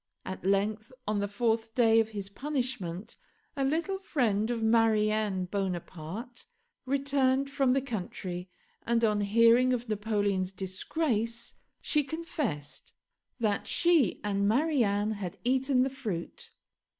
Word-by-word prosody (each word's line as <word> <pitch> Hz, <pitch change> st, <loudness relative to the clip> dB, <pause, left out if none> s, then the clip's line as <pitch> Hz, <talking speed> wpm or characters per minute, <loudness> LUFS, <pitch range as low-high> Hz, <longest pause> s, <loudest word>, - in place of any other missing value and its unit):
At 190 Hz, -, -6 dB
length, 205 Hz, +3 st, 0 dB, 0.2 s
on 210 Hz, -1 st, +1 dB
the 205 Hz, -, 0 dB
fourth 225 Hz, +1 st, -1 dB
day 225 Hz, -2 st, +5 dB
of 220 Hz, -1 st, +1 dB
his 200 Hz, -3 st, -5 dB
punishment 240 Hz, -, -4 dB, 0.4 s
a 275 Hz, -, 0 dB
little 335 Hz, +8 st, 0 dB
friend 225 Hz, -, 0 dB
of 235 Hz, -2 st, -1 dB
Marianne 215 Hz, -3 st, +2 dB
Bonaparte 190 Hz, -, -5 dB, 0.4 s
returned 275 Hz, 0 st, +1 dB
from 270 Hz, -2 st, +2 dB
the 270 Hz, 0 st, +1 dB
country, 185 Hz, -6 st, -5 dB, 0.3 s
and 235 Hz, 0 st, 0 dB
on 210 Hz, -2 st, +2 dB
hearing 230 Hz, +5 st, +5 dB
of 245 Hz, 0 st, -2 dB
Napoleon's 205 Hz, -3 st, 0 dB
disgrace 230 Hz, -, -2 dB, 0.3 s
she 300 Hz, -1 st, +1 dB
confessed 275 Hz, -, -4 dB, 0.5 s
that 210 Hz, -3 st, 0 dB
she 330 Hz, -, +4 dB
and 200 Hz, -1 st, +1 dB
Marianne 220 Hz, -5 st, +2 dB
had 200 Hz, -5 st, -5 dB
eaten 260 Hz, +1 st, +2 dB
the 265 Hz, -, -1 dB
fruit. 265 Hz, -, -5 dB
225 Hz, 125 wpm, -29 LUFS, 200-260 Hz, 0.5 s, day